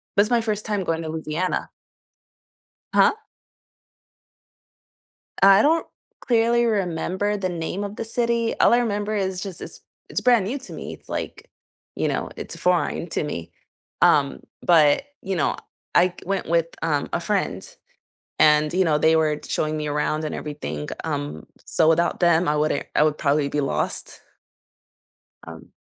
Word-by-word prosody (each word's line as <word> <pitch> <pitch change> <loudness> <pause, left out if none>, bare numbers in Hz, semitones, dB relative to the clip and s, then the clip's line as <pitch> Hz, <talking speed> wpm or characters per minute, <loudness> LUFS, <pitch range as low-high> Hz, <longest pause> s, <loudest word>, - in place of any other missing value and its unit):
That's 205 +2 +4
my 240 -1 +3
first 215 -2 -2
time 210 -3 -1
going 165 -2 -1
to 160 - -5
Louisiana. 160 +3 -2 1.2
Huh? - - +6 2.3
I 195 +1 +8
don't 325 +3 +2 0.3
clearly 235 0 +2
remember 200 -1 -1
the 190 -2 -2
name 175 +3 -3
of 205 +1 -6
the - - -4
city, 235 0 -1
all - - +6
I 240 - +5
remember 210 -3 -1
is 190 -3 -1
just 190 -4 -7
it's - - -9 0.3
it's - - -2
brand 240 -6 +4
new 255 +7 -2
to 265 - -12
me, - - -7
it's - - -18
like, - - -5 0.4
you - - -1
know - - -2
it's - - -7
foreign 180 -1 0
to - - -1
me, 85 - -6 0.5
um, - - +4 0.2
but, 155 - +4 0.2
you 190 -1 -2
know, 160 - 0 0.4
I 180 +1 +4
went 195 -3 -2
with, 165 0 +2 0.2
um, 150 -3 0
a - - 0
friend 170 - -1 0.7
and, 150 0 +4
you 185 +1 +2
know, 155 -2 +3
they 160 +1 +4
were 155 -2 +1
showing 155 0 -1
me 150 0 -3
around 150 +1 -1
and 155 - -3
everything, 145 - -5 0.2
um, 75 +2 -4 0.2
so 160 - +2
without 170 +3 +2
them, 170 -1 +3
I 150 - +2
wouldn't 150 -1 0
I - - +5
would 155 -1 +1
probably 145 0 +1
be 150 - -1
lost. 140 - -3 1.3
Um - - -11
175 Hz, 160 wpm, -23 LUFS, 155-205 Hz, 2.3 s, I